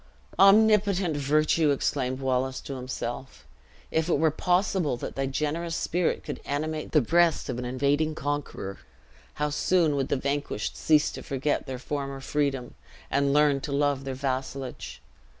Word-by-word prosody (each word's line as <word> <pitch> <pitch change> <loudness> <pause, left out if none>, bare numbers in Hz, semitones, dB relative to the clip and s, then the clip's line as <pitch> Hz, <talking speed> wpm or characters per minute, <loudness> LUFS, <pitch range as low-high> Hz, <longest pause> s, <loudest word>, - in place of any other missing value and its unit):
"Omnipotent 200 -3 +5
virtue!" 150 +2 +2
exclaimed 130 -2 -1
Wallace 130 0 0
to 140 - -7
himself; 130 0 -6 0.5
"if 160 +2 0
it - - +3
were 160 +1 +3
possible 180 -3 +1
that - - -6
thy 135 0 -1
generous 155 +5 -2
spirit 175 0 0
could - - -6
animate 155 +2 -3
the 150 - +5
breast 170 +6 +2
of 120 - -3
an 125 - -4
invading 140 +5 0
conqueror, 145 -10 -4 0.6
how 150 0 -1
soon 160 0 +2
would 135 -1 0
the - - 0
vanquished 140 -5 -2
cease 155 -1 +3
to - - -8
forget 140 +1 -2
their 130 -1 -4
former 140 +1 -4
freedom, 135 -3 -2 0.4
and 140 0 +2
learn 145 -1 +3
to 145 - -5
love 140 -1 +1
their 135 -1 -4
vassalage! 130 -1 -4
145 Hz, 150 wpm, -27 LUFS, 135-155 Hz, 0.6 s, Omnipotent